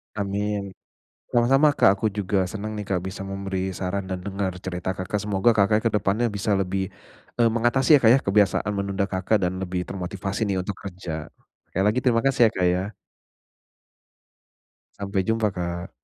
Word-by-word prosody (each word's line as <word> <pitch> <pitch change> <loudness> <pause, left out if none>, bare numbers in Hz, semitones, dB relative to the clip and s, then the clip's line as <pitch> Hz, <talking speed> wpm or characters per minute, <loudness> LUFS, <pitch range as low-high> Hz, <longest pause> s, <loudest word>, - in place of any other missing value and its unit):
Amin! 100 0 -2 0.6
Sama-sama, 135 +5 +4
Kak. 95 - +6
Aku 100 +2 -4
juga 95 -2 -1
senang 110 0 -5
nih, 105 -1 -5
Kak, 90 -3 0
bisa 95 +1 -6
memberi 95 -1 -3
saran 95 +1 -3
dan 95 - -2
dengar 100 -2 -2
cerita 90 0 -4
Kakak. 95 +2 -2
Semoga 105 +2 +2
Kakaknya 105 +1 +3
ke 115 - +3
depannya 105 +3 +1
bisa 100 0 +1
lebih 95 0 -1 0.5
e - - +2
mengatasi 120 +6 +4
ya, - - -2
Kak, 110 - +6
ya 135 - +5
kebiasaan 100 +1 +2
menunda 100 0 -1
Kakak 95 +3 +1
dan 95 +1 -3
lebih 90 -1 -3
termotivasi 100 +3 -3
nih 95 - 0
untuk 100 +2 -4
kerja. 85 -5 -6 0.4
Sekali 95 - 0
lagi, 110 +5 +3
terima 115 -3 +2
kasih 135 -2 +2
ya, - - -14
Kak, 90 - +2
ya. 90 +1 0 2.2
Sampai 100 -1 -1
jumpa, 110 -1 +1
Kak. 85 -2 -4
100 Hz, 170 wpm, -24 LUFS, 95-105 Hz, 2.2 s, Kak